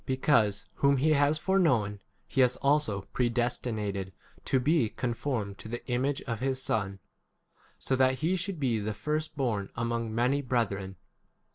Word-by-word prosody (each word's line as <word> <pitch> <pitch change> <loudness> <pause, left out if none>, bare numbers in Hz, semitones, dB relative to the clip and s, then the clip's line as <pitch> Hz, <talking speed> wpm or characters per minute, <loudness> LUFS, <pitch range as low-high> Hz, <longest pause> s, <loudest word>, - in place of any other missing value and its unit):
Because 115 -6 +2
whom 140 0 +3
he 155 +4 +3
has 145 +1 +3
foreknown, 145 - +2 0.3
he 135 - +1
has 125 -1 +4
also 140 -8 +2
predestinated 115 -5 -1 0.3
[to 130 - +2
be] 140 -3 +2
con 120 +1 -2
formed 110 -6 -3
to - - -8
the 120 +2 -6
image 135 +3 -1
of 115 -4 -4
his 130 +1 -1
Son, 100 -6 -1 0.8
so 130 - 0
that 130 0 +3
he 165 +7 0
should 185 -1 -3
be 120 -5 +1
[the] 105 0 -3
first 150 +8 -3
born 110 -8 -1
30 - - -30
among 115 -1 -2
many 125 +5 +2
brethren. 100 -7 -1
125 Hz, 160 wpm, -29 LUFS, 110-140 Hz, 0.8 s, has